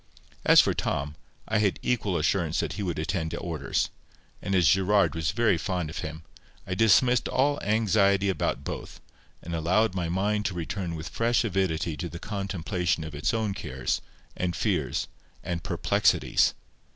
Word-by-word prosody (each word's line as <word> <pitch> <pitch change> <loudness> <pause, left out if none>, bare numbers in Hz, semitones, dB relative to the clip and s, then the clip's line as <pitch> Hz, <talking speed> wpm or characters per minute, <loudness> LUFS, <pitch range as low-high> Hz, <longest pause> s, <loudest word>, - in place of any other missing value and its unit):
As - - +7
for - - +5
Tom, 75 +2 -2 0.3
I 110 0 +1
had 100 -3 +2
equal 105 -7 0
assurance 80 0 +1
that - - -1
he - - -5
would 90 -4 -2
attend 80 +1 -2
to 85 - -4
orders; 80 -5 -2 0.5
and 95 - -1
as 90 -4 +4
Gerard 95 +2 +3
was 80 -1 -1
very 110 -3 +2
fond 85 -2 -2
of - - -6
him, 80 +1 -6 0.4
I 90 - -3
dismissed 115 +5 +4
all 145 +2 +1
anxiety 100 -2 +2
about 95 - -1
both, - - -6 0.4
and 85 - -6
allowed 90 +6 +2
my 90 -3 -2
mind 105 +4 0
to 90 - -4
return 85 +1 -3
with 80 +1 -6
fresh 120 +2 +1
avidity 85 -6 -1
to 85 +4 -4
the 85 - -7
contemplation 90 -4 -2
of 80 -1 -7
its 70 +7 0
own 110 -4 -1
cares, 65 -6 -3 0.3
and 90 -2 -2
fears, - - -1 0.4
and 85 -2 -3
perplexities. - - +2
90 Hz, 165 wpm, -27 LUFS, 80-105 Hz, 0.5 s, As